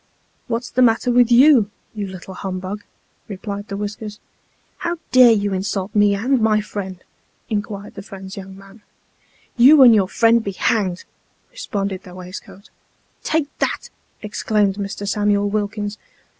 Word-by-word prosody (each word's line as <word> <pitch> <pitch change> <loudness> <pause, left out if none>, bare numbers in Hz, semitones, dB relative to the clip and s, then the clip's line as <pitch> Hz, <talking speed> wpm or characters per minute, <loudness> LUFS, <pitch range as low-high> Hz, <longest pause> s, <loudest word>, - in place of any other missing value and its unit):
" - - -42
What's 235 +1 -3
the 255 - +1
matter 240 +1 +3
with 245 0 +4
you, 245 -3 +6 0.2
you 205 -2 -4
little 190 0 -9
humbug? 190 +2 -5 0.2
" - - -42
replied 205 0 -6
the 200 - -5
whiskers. 210 +1 -6 0.3
" - - -41
How 345 0 -1
dare 255 -2 +7
you 205 -2 +1
insult 195 +1 -3
me 205 -1 +4
and 245 +5 +1
my 215 -1 +3
friend? 190 -3 -6 0.2
" - - -42
inquired 205 -1 -4
the 195 - -8
friend's 195 -1 -10
young 190 -1 -9
man. 195 +2 -16 0.4
" - - -36
You 280 +1 +9
and 240 -3 +8
your 200 -4 +3
friend 230 0 +3
be 200 - -4
hanged! 185 -3 0 0.3
" - - -41
responded 200 - -4
tho 180 -2 -13
waistcoat. 185 +2 -11 0.5
"Take 310 -2 -1
that," - - -2 0.3
exclaimed 210 -1 0
Mr. 200 0 -5
Samuel 205 0 +1
Wilkins. 205 0 -3
205 Hz, 165 wpm, -20 LUFS, 195-225 Hz, 0.5 s, You